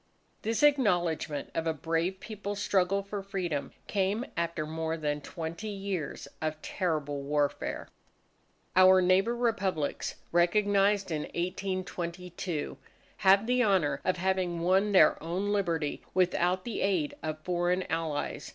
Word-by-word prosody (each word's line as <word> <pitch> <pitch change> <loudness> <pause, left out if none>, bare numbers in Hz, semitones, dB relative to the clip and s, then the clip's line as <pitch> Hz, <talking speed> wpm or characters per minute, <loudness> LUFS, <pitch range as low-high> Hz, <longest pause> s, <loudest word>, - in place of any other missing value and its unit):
This 225 +5 -1
acknowledgment 175 - +2
of 165 0 -1
a 160 - 0
brave 165 +5 -1
People's 205 -2 -5
struggle 195 -1 +2
for 200 0 -5
freedom, 185 -7 -3
came 200 +4 0
after 170 -2 -1
more 160 +1 -3
than 150 -2 -2
twenty 165 +7 -6
years 195 -5 -4
of 155 -1 -2
terrible 150 -6 -2
warfare. 145 0 -1 0.9
Our 185 0 +8
neighbour 190 +6 +3
Republics 200 -10 -1 0.2
recognized 200 +2 +3
in 150 -2 -1
1822, 180 -2 -3 0.4
have 195 +1 +5
the 250 +1 +3
honour 160 - +2
of 185 - +1
having 185 -2 0
won 190 +4 +3
their 180 -6 +5
own 180 +6 -2
Liberty 170 -7 -1
without 180 0 +2
the 235 - -3
aid 180 -7 +1
of 155 -1 -3
foreign 180 +1 +1
Allies. 160 -3 -3
180 Hz, 125 wpm, -30 LUFS, 160-195 Hz, 0.9 s, Our